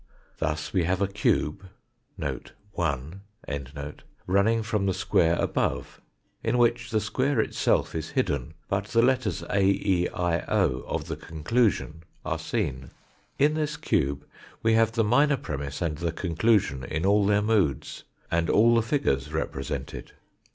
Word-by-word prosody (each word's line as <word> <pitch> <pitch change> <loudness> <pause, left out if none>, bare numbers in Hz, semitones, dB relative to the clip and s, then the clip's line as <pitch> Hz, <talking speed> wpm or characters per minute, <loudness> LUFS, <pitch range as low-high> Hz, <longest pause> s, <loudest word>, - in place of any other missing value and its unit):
Thus 75 -1 -2
we 90 -4 +2
have 90 +1 0
a 100 - +2
cube 95 -2 0 0.5
(1) 80 -3 -4 1.0
running 105 +5 +2
from 105 -2 -1
the 95 - +2
square 85 -3 +2
above, - - -1 0.4
in - - +1
which 120 0 +2
the 110 - +1
square 130 +5 0
itself - - +1
is 80 -2 -4
hidden, 70 +2 -1
but 100 0 -1
the 115 +2 +2
letters 130 -3 +1
A, 100 - +2
E, 95 -2 +2
I, 85 -1 0
o, 65 - +1
of 80 -2 -3
the 80 - -3
conclusion 80 +1 0 0.2
are 80 - -2
seen. 80 - -3 0.5
In 150 +2 +4
this 155 -1 -2
cube 70 - 0 0.4
we 115 0 +4
have 115 0 +3
the 115 -1 +2
minor 140 +6 +3
premiss 70 - -4
and 80 -2 -2
the 85 -1 -1
conclusion 85 - +1
in 80 +5 -2
all 100 +1 +4
their 105 0 +3
moods, 100 - 0 0.3
and 85 0 +1
all 115 +2 +5
the 115 - +4
figures 80 - 0
represented. 70 -4 -4
95 Hz, 145 wpm, -26 LUFS, 80-115 Hz, 1.0 s, all